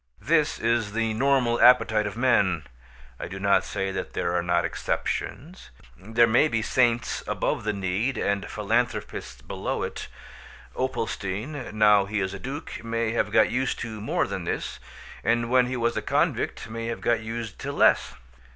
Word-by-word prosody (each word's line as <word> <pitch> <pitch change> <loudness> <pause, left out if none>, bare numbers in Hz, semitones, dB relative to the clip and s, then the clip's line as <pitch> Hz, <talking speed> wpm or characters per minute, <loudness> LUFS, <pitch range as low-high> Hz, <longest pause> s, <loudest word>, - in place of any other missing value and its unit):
This 155 -1 +2
is 115 -2 0
the 115 0 0
normal 125 -1 +2
appetite 110 -3 +5
of 105 - -6
men; 100 - +2 0.5
I - - -4
do 95 +2 -7
not 100 0 +3
say 95 0 -3
there 90 -2 -3
are 90 - +1
not 85 0 +1
exceptions. 170 +8 -4 0.3
There 110 - +2
may 120 +7 +4
be 115 -6 -1
saints 120 -1 +1
above - - -1
the 105 - 0
need 100 +6 -1
and 100 -1 -1
philanthropists 115 +4 -2
below - - -3
it. - - -5 0.7
Opalstein, 120 +1 -3
now 105 -2 +5
he 105 +1 -2
is 95 0 -2
a 100 - -6
duke, 140 +4 -6
may 115 -1 -1
have 115 - 0
got - - +4
used 130 0 0
to 110 -2 -5
more 110 - 0
than - - -4
this; - - -3 0.4
and 115 0 +1
when 125 -1 +4
he 130 0 -3
was 115 0 0
a - - -1
convict - - 0
may 115 +1 -5
have 115 - -4
got 120 -1 +2
used 110 -1 -6
to - - -4
less. - - +3
115 Hz, 170 wpm, -26 LUFS, 100-120 Hz, 0.7 s, appetite